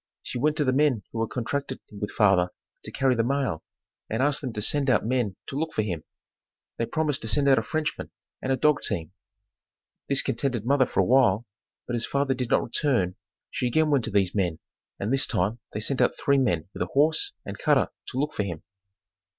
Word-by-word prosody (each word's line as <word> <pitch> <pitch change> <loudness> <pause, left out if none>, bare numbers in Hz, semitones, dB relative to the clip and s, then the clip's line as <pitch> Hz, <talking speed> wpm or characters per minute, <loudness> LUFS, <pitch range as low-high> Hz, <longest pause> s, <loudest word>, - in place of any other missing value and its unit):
She 125 - -4
went 150 +4 +1
to 150 - +2
the 130 - +2
men 135 -6 +2
who 115 - -3
had 115 - -1
contracted 130 +2 -3
with 105 0 -4
father 95 -4 +3 0.4
to - - -7
carry 130 -1 +2
the 115 -2 +1
mail 135 - -1 0.5
and 115 +4 0
asked 145 0 +1
them 130 -4 -3
to 105 - -4
send 145 +2 +1
out 125 - +3
men 120 -5 0
to - - -7
look 160 +3 -2
for 110 - +2
him. 85 -7 -3 0.7
They 115 - -1
promised 155 -3 -1
to 110 - -5
send 140 +6 +2
out 135 -1 +6
a - - -1
Frenchman, 155 -1 -3 0.3
and 130 - -1
a - - +4
dog 150 +2 +3
team. 85 -6 -1 1.0
This 140 -1 +2
contented 125 -6 -1
mother 135 -1 +3
for - - +1
awhile, 120 0 +4 0.4
but 120 - -2
as 115 - -2
father 140 -1 +1
did 125 -2 -3
not - - +3
return 120 -8 0 0.4
she 125 - -1
again 155 +5 +2
went 140 -4 +3
to - - -3
these 100 -3 +2
men 90 -6 0 0.4
and 105 +6 -1
this 135 +1 +2
time 100 +7 0
they 105 - -4
sent 130 +5 0
out - - +2
three 140 -1 +3
men 85 - +1
with - - -7
a - - +1
horse 160 - +3
and - - -7
cutter - - +3 0.2
to 130 - -6
look 150 +2 0
for - - -1
him. 85 -6 -4
125 Hz, 215 wpm, -26 LUFS, 105-140 Hz, 1.0 s, out